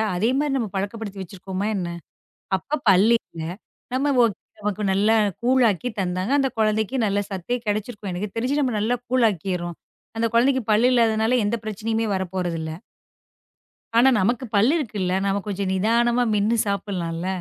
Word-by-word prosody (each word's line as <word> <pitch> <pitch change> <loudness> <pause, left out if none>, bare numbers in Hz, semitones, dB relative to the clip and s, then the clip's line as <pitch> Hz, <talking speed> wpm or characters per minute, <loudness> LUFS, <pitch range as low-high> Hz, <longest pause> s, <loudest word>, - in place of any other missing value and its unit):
அதே 210 +6 +1
மாதிரி 290 -1 0
நம்ம 235 -4 -1
பழக்கப்படுத்தி 200 +1 -4
வச்சிருக்கோமா 190 +1 -5
என்ன? 180 -3 -2 0.7
அப்பப் 285 - -4
பல் 195 +3 +6
இல்ல. 165 - -12 0.5
நம்ம 280 +2 +1 0.5
நமக்கு 210 0 -3
நல்லா 205 +3 +3 0.3
கூழாக்கி 245 -4 +2
தந்தாங்க. 185 +4 -1
அந்தக் 270 -3 0
குழந்தைக்கு 220 +3 +1
நல்லா 205 -1 +1
சத்தே 195 +6 -2
கிடைச்சுருக்கும். 210 0 -3
எனக்குத் 190 +3 -4
தெரிஞ்சு 255 +5 0
நம்ம 255 -5 0
நல்லா 225 +4 +1
கூழாக்கிர்றோம். 190 -8 0 0.4
அந்தக் 225 0 0
குழந்தைக்குப் 250 -1 +2
பல் 220 +3 +4
இல்லாததுனால, 230 0 +3
எந்தப் 225 +1 -2
பிரச்சனையும் 220 +1 -2
வரப்போறது 180 -2 -2
இல்ல. 160 - -4 1.3
ஆனா, 250 +3 +7
நமக்குப் 235 +4 -1
பல் 215 +7 +5
இருக்குல்ல. 205 - -2
நம்ம 200 0 +1
கொஞ்சம் 200 -1 -2
நிதானமா 235 +5 +2
மென்னு 210 +3 +2
சாப்பிடுலாம்ல. 180 -4 -3
210 Hz, 140 wpm, -23 LUFS, 190-235 Hz, 1.3 s, ஆனா